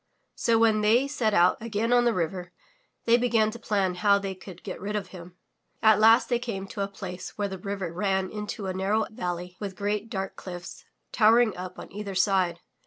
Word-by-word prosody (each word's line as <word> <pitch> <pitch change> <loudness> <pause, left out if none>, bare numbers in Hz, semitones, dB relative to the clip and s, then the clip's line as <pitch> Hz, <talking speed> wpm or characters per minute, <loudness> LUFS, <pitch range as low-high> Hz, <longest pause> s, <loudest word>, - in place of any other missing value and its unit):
So 230 -1 +2
when 220 -1 +3
they 230 +6 +3
set 245 -6 0
out 180 -1 +3
again 230 +1 -1
on 245 0 +4
the 235 - +3
river 180 +1 -3 0.5
they 235 0 +5
began 230 -3 +2
to 235 - -9
plan 195 -5 0
how 200 +2 +3
they 195 -1 -4
could 185 -1 -12
get 185 - -7
rid 205 +2 -3
of 205 -2 -3
him. 175 -1 -11 0.5
At 220 -1 +6
last 225 +2 +6
they 240 -1 +1
came 220 -6 -4
to 200 - -5
a 195 - 0
place 190 -2 -8
where 205 -1 0
the 190 -1 -6
river 195 -3 -4
ran 190 +1 0
into 210 -1 -5
a 190 - -2
narrow 200 +4 0
valley 180 -2 -5
with 200 -2 -5
great, 205 +2 -2
dark 195 -4 -4
cliffs 175 -1 -9 0.3
towering 225 0 +4
up 180 0 -7
on - - -10
either 200 -1 -5
side. 185 -3 +1
200 Hz, 205 wpm, -27 LUFS, 185-220 Hz, 0.5 s, At